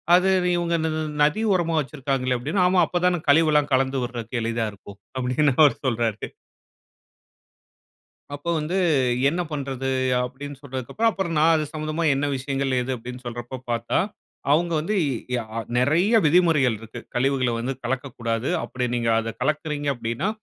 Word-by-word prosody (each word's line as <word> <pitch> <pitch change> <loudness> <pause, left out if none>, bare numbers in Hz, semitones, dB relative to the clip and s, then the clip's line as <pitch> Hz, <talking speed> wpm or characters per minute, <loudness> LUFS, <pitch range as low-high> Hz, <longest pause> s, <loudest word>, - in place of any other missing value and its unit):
அது 185 +1 +4 0.3
இவங்க 170 -1 -1
இந்த 160 0 0 0.3
நதி 150 +9 +2
ஓரமா 170 -2 +1
வச்சிருக்காங்களே!' 135 -3 -1
அப்பிடின்னு. 155 +10 0
'ஆமா, 180 0 +4
அப்ப 175 -1 -1
தான 175 -3 +2
கழிவு 160 +2 +5
எல்லாம் 150 -1 +2
கலந்து 130 0 +2
விட்றக்கு 120 0 -4
எளிதா 115 0 -1
இருக்கும்' 100 0 -13 0.2
அப்பிடின்னு 130 +2 +2
அவரு 140 -5 +5
சொல்றாரு. 115 -3 -1 2.1
"அப்போ 145 +4 -6
வந்து 165 +5 -2 0.5
என்ன 175 +3 -1
பண்றது?" 135 -2 -3 0.3
அப்பிடின்னு 135 +2 -7
சொல்றதுக்கு 135 - -4
அப்புறம், 175 -5 -3
நான் 165 +1 +5
அது 155 -1 0
சம்மந்தமா 155 +2 -2
என்ன 140 +2 0
விஷயங்கள் 135 -1 -1
எது 130 +1 -2
அப்பிடின்னு 125 +2 -9
சொல்றப்போ 120 +2 -6
பார்த்தா, 115 0 0 0.5
அவுங்க 170 +2 +2
வந்து 205 +7 -1
அ - - +1 0.3
யா 120 - -1 0.3
நிறைய 170 - +3
விதிமுறைகள் 150 -7 +4
இருக்கு. 115 0 -9 0.2
"கழிவுகள 130 -1 +1
வந்து 130 +3 -2
கலக்கக்கூடாது. 120 -2 -2
அப்பிடி 125 -1 -3
நீங்க 115 -1 0
அத 115 0 -3
கலக்கிறீங்க 150 -1 -1
அப்பிடின்னா, 120 - -2
135 Hz, 145 wpm, -24 LUFS, 125-160 Hz, 2.1 s, கழிவு